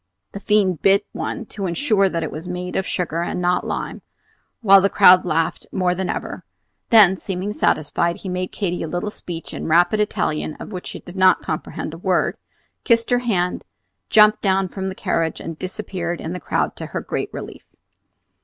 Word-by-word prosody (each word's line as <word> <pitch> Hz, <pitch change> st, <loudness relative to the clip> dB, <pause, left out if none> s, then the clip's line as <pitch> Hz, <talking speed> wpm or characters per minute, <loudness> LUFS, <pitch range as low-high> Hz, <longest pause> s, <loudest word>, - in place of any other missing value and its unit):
The 200 Hz, -, -7 dB
fiend 200 Hz, -5 st, +1 dB
bit 200 Hz, +1 st, +4 dB
one -, -, -4 dB
to 200 Hz, -2 st, -3 dB
insure 195 Hz, +1 st, +2 dB
that 165 Hz, -2 st, -2 dB
it 155 Hz, -, -4 dB
was 160 Hz, +4 st, -7 dB
made 180 Hz, 0 st, -5 dB
of 190 Hz, -, -1 dB
sugar 170 Hz, -2 st, -2 dB
and 175 Hz, -, -3 dB
not 180 Hz, 0 st, +1 dB
lime, -, -, -4 dB, 0.6 s
while 195 Hz, -3 st, +7 dB
the 200 Hz, -, +2 dB
crowd 180 Hz, 0 st, +6 dB
laughed 165 Hz, -1 st, -1 dB
more 180 Hz, -2 st, +1 dB
than 185 Hz, +1 st, -3 dB
ever; -, -, -4 dB, 0.5 s
then, 210 Hz, -6 st, +7 dB
seeming 190 Hz, +2 st, -4 dB
satisfied, 170 Hz, 0 st, +1 dB
he -, -, -9 dB
made 185 Hz, 0 st, -3 dB
Katy 180 Hz, -4 st, -2 dB
a -, -, -3 dB
little 175 Hz, +6 st, -3 dB
speech 170 Hz, -5 st, -8 dB
in -, -, -5 dB
rapid 175 Hz, +6 st, +3 dB
Italian, 155 Hz, -7 st, -1 dB
of -, -, -9 dB
which 180 Hz, -3 st, -6 dB
she -, -, -7 dB
did 175 Hz, -, -12 dB
not 185 Hz, -1 st, +4 dB
comprehend 155 Hz, 0 st, -4 dB
a 165 Hz, -, -9 dB
word, 180 Hz, -1 st, +1 dB, 0.5 s
kissed 230 Hz, 0 st, +2 dB
her 245 Hz, -, +4 dB
hand, 185 Hz, -7 st, -1 dB, 0.5 s
jumped 215 Hz, 0 st, +6 dB
down 195 Hz, -1 st, +2 dB
from 190 Hz, +1 st, -4 dB
the 190 Hz, -, -6 dB
carriage 165 Hz, -3 st, -1 dB
and 165 Hz, -1 st, -7 dB
disappeared 185 Hz, -3 st, -4 dB
in 160 Hz, -, -5 dB
the 180 Hz, -, -5 dB
crowd -, -, -1 dB
to -, -, -6 dB
her -, -, -4 dB
great -, -, -4 dB
relief. -, -, -9 dB
185 Hz, 190 wpm, -21 LUFS, 170-200 Hz, 0.6 s, while